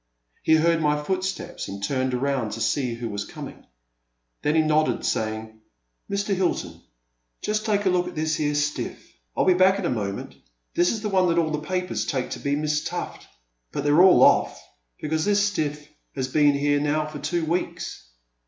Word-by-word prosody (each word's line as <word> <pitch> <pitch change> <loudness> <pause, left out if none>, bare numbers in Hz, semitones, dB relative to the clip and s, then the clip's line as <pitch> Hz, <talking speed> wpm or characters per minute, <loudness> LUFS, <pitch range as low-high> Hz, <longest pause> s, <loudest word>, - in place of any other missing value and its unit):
He 160 - +4
heard 165 +1 +3
my 150 -1 +2
footsteps, 190 +4 -3
and 100 0 -7
turned 130 +2 0
around 130 -4 -1
to 115 - -5
see 125 0 0
who 115 0 -5
was 100 -2 -3
coming. - - -10 0.7
Then 150 +1 +1
he 160 - +4
nodded, 155 0 +2
sa5dng: 110 0 -2 0.5
Mr. 200 0 -1
Hilton, 185 -2 -1 0.6
just 215 +1 -1
take 205 -1 +1
a 190 - +4
look 180 0 +1
at - - -7
this 155 0 0
here 150 -1 0
stiflF— 145 0 -1 0.4
I - - +3
*11 - - +2
be - - +7
back 185 +2 +4
in 200 - -3
a - - 0
moment 100 -4 -3 0.2
— - - -48
^this 175 +1 +3
is 220 - -3
the 210 - -1
one 185 -2 +3
that 170 - +1
all 160 -2 +2
the 150 - -1
papers 180 +3 -2
take 130 -6 -2
to - - -4
be 140 0 0
Miss 150 0 0
Tuffl:,— - - -5 0.5
but - - -3
they 145 - +2
're 155 +4 +6
all 185 -1 +7
olBT, - - +5 0.5
because 155 +1 0
this 205 0 +2
stiflF 150 -5 -3 0.3
has 130 -2 -1
been 145 +1 +3
here 145 +1 +2
now 150 +1 0
for 150 -1 -7
two 160 +3 -1
weeks. 170 - -3
155 Hz, 200 wpm, -24 LUFS, 140-180 Hz, 0.7 s, be